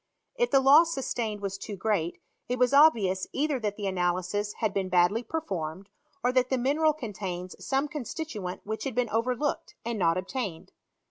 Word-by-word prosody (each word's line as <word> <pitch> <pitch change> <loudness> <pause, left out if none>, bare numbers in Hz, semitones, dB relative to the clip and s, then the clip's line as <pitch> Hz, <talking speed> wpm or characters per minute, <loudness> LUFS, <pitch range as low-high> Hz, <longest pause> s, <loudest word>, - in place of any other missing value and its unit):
If 485 -1 +1
the 275 - +5
loss 315 +5 +6
sustained 225 -6 -2
was 195 -1 -4
too 205 - -6
great, 195 -5 -1 0.3
it 250 - 0
was 250 +1 +3
obvious 220 -11 +5
either 285 -1 0
that 210 -3 -2
the 205 - -4
analysis 185 +2 -1
had 215 -3 -1
been 190 -2 -1
badly 180 +5 +3
performed, 195 - -4 0.3
or 245 - +3
that 255 0 +2
the 260 - +1
mineral 295 +5 +2
contains 190 - -5
some 270 +2 0
constituent 275 - -5
which 220 +4 -4
had 265 -4 -3
been 245 -3 0
overlooked, 250 +6 -1
and 230 -2 -2
not 165 -2 +3
obtained. 190 -2 -4
220 Hz, 175 wpm, -28 LUFS, 190-270 Hz, 0.3 s, loss